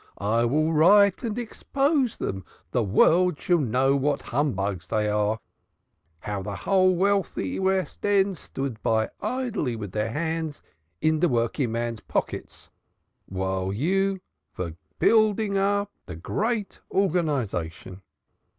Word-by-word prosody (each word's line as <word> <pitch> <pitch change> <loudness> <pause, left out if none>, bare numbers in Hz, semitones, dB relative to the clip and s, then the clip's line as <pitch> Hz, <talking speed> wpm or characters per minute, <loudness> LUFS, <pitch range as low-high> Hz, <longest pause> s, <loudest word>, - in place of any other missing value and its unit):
I 110 +4 +1
will 155 +6 +1
write 195 +5 +5
and 230 -2 -3
expose 270 +2 0
dem 95 0 -3 0.3
the 125 - +1
world 160 - +3
shall 175 -1 +2
know 135 +1 +2
what 140 +1 0
humbugs 100 - -1
dey 105 +2 0
are, 105 +1 +1 0.8
how 105 -1 -3
de 100 +1 -5
whole 185 - +3
wealthy 195 +1 0
West 190 -3 -1
End 200 -1 +3
stood 135 -6 -5 0.4
idly 215 - -2
by - - -7
with 100 -3 -6
her 105 +1 -1
hands 160 +2 -3 0.4
in 155 0 +2
de 175 +1 +3
working 120 0 0
men's 115 -1 -2
pockets - - -4 0.6
while 95 0 -2
you 190 - 0 0.3
vere 85 -3 -4 0.2
building 215 -2 +3
up 200 +1 +1 0.2
de 90 - -6
great 210 - -2
organization. 125 - -1
150 Hz, 125 wpm, -25 LUFS, -, 0.8 s, write